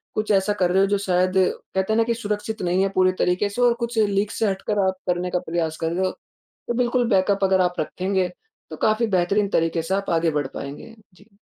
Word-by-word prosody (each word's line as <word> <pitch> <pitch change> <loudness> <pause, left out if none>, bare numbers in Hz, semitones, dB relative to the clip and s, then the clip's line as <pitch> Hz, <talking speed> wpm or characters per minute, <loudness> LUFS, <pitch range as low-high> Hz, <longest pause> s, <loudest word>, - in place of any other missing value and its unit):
कुछ 215 0 -1
ऐसा 200 +1 +2
कर 180 0 +3
रहे 190 +1 +3
हो 195 - +3
जो 205 0 +1
शायद 185 -1 +1
कहते 190 +2 0
हैं - - +1
ना 230 - +4
कि 235 0 0
सुरक्षित 210 -1 -4
नहीं 180 +2 +1
है 195 - +1
पूरी 185 0 +4
तरीक़े 185 +3 +1
से 245 +5 -4
और 240 -1 +5
कुछ 235 0 -4
लीग 200 -1 +1
से 220 - +2
हटकर 200 +2 -1
आप 190 0 -1
करने 180 0 0
का 180 - +1
प्रयास 165 -2 -1
कर 165 0 -2
रहे 190 +2 0
हो 185 - 0 0.6
तो 240 - -1
बिल्कुल 245 -1 +1
बैकअप 195 0 +2
अगर 190 -1 +3
आप 180 -2 0
रखेंगे 185 +3 -1 0.4
तो - - -7
काफ़ी 220 +2 +2
बेहतरीन 195 +2 +1
तरीक़े 165 0 -1
से 190 +3 -1
आप 200 0 -3
आगे 165 -1 +2
बढ़ 145 -2 -1
पाएँगे 145 +11 -8 0.2
जी। 200 +2 -23
190 Hz, 235 wpm, -23 LUFS, 180-210 Hz, 0.6 s, और